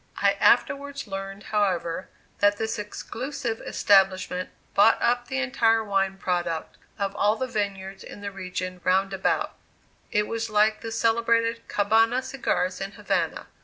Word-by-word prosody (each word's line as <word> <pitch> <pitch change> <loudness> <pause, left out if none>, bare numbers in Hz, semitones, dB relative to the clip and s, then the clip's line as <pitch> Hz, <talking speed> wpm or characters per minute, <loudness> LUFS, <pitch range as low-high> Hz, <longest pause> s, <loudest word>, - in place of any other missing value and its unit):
I - - +4
afterwards 280 0 +2
learned, 195 0 -6
however, 185 -4 0 0.3
that 205 0 +4
this 220 0 -2
exclusive 230 +3 -4
establishment 190 -2 +2 0.2
bought 205 +3 +5
up 245 0 +1
the 265 - -3
entire 230 -4 +2
wine 195 -2 0
product 175 -4 -2 0.2
of 200 -1 -2
all 210 +1 +3
the 260 - -2
vineyards 195 -4 -4
in 205 - -10
the 200 0 -5
region 185 -1 -5
round 190 +1 +2
about 190 - 0 0.5
it 210 -1 +1
was 230 0 -3
like 215 0 +3
the 225 - -5
celebrated 230 0 +1
"Cabana" 225 +5 +3
cigars 195 -9 -1
in 195 +1 -4
Havana. - - -1
205 Hz, 140 wpm, -26 LUFS, 195-230 Hz, 0.5 s, bought